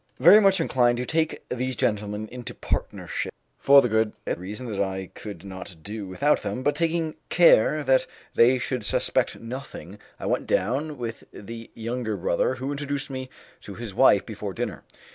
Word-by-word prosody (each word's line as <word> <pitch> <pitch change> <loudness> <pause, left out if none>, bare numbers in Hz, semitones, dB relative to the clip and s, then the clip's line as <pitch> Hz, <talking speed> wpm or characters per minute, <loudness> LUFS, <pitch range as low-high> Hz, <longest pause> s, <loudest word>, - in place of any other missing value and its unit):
Very 175 +10 +8
much 195 -2 +4
inclined 120 -6 +2
to 125 - -2
take 160 +1 -1
these 130 +1 -2
gentlemen 105 -1 -1
into 125 -1 -7
partnership, - - -3 0.3
for 140 0 +7
the - - +2
good 110 -1 +1 0.2
reason 100 +8 -7
that 100 - -1
I 95 -1 -3
could 100 -4 -9
not 95 -1 -8
do 105 -1 -6
without 140 +11 +1
them, 130 - -4
but 145 - +2
taking 165 0 0 0.2
care 155 -3 +5
that 130 -1 +3 0.3
they 125 +3 +5
should 125 -1 -3
suspect - - 0
nothing, 115 - -8 0.2
I - - -6
went - - -1
down 140 +9 0
with 115 -2 -6
the 115 +2 -9
younger 115 -1 -3
brother, 90 +7 0
who 130 +2 -4
introduced 145 -1 -3
me 130 -1 -5 0.3
to - - -9
his - - -7
wife - - +5
before - - -6
dinner. - - -4
125 Hz, 170 wpm, -25 LUFS, 105-140 Hz, 0.3 s, Very